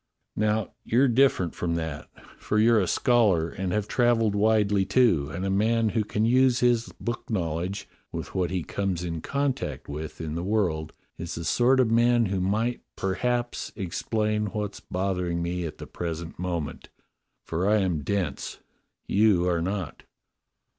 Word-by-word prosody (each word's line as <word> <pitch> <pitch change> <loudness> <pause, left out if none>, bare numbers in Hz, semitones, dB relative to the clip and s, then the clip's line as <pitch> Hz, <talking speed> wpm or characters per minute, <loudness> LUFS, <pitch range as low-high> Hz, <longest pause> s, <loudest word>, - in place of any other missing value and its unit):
Now 105 -1 0
you're 130 +4 +3
different 120 - +3
from 85 -1 -2
that, 80 -3 -4 0.3
for 105 - -1
you're 115 +1 +5
a 95 - +1
scholar 100 -8 +3
and 95 -1 -3
have 105 +1 -1
travelled 115 -3 +2
widely, 105 -1 +3
too, 95 - +3
and 90 +4 -4
a 95 - 0
man 110 +3 +2
who 110 0 0
can 105 +1 -1
use 125 +1 +4
his 120 -2 +2
book 120 0 -4
knowledge 90 -1 -2 0.2
with - - -6
what 90 -2 0
he 90 -2 -2
comes 95 -2 -2
in 85 -2 -4
contact 140 - -2
with 75 +2 -6
in 80 -2 -4
the 85 - -2
world 90 -6 0 0.3
is 85 - -5
the 85 - -5
sort 125 +7 +3
of 120 -3 +3
man 120 0 +4
who 95 -2 -1
might 110 +6 0
perhaps 120 +5 -1
explain 105 +3 -1
what's 105 -1 -4
bothering 90 -2 -2
me 85 +1 -2
at 75 - -9
the - - -8
present 85 -1 -5
moment, 85 -4 -4 0.6
for 90 +5 0
I 110 - +4
am 90 -5 0
dense; 90 -3 -2 0.5
you 100 -4 +3
are 85 -2 +1
not." 90 -5 -3
100 Hz, 160 wpm, -26 LUFS, 85-115 Hz, 0.6 s, you're